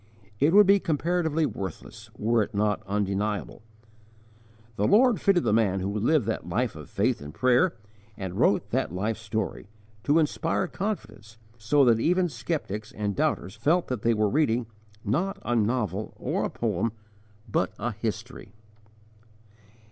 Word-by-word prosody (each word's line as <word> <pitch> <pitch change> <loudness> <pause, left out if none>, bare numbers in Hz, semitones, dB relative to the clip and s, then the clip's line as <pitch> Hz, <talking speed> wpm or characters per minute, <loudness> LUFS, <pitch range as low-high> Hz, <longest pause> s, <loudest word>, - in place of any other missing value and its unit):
It 145 +3 +4
would 205 +2 +7
be 200 +1 +5
comparatively 165 -1 0
worthless, 100 - -7
were 115 +2 +2
it 105 - -4
not 105 0 +1
undeniable. 105 +2 -2 1.1
The 105 - +1
Lord 240 +1 +4
fitted 190 -4 +3
the 110 - +1
man 105 -4 +2
who 95 +2 -2
lived 120 +5 +2
that - - -3
life - - -1
of - - -10
faith - - 0
and 75 0 -8
prayer, 130 - +2 0.4
and 95 -2 -5
wrote - - +1
that - - 0
life 105 +5 -2
story, 110 -2 -4 0.4
to 145 +2 +4
inspire 165 +3 +1
confidence, 115 - -5 0.2
so 135 +6 +3
that 115 -2 +4
even 180 +6 +2
skeptics 115 - -4
and 105 -2 -3
doubters 95 +2 -1
felt 165 +7 +1
that 125 -5 -2
they 115 0 +2
were 105 0 +2
reading, 125 -1 +1 0.4
not 180 - 0
a 120 - 0
novel 110 -3 -1
or - - -1
a - - -2
poem, 110 -1 -1 0.5
but 95 -4 0
a 120 +3 -2
history. 110 -1 -6
115 Hz, 150 wpm, -26 LUFS, 105-155 Hz, 1.1 s, would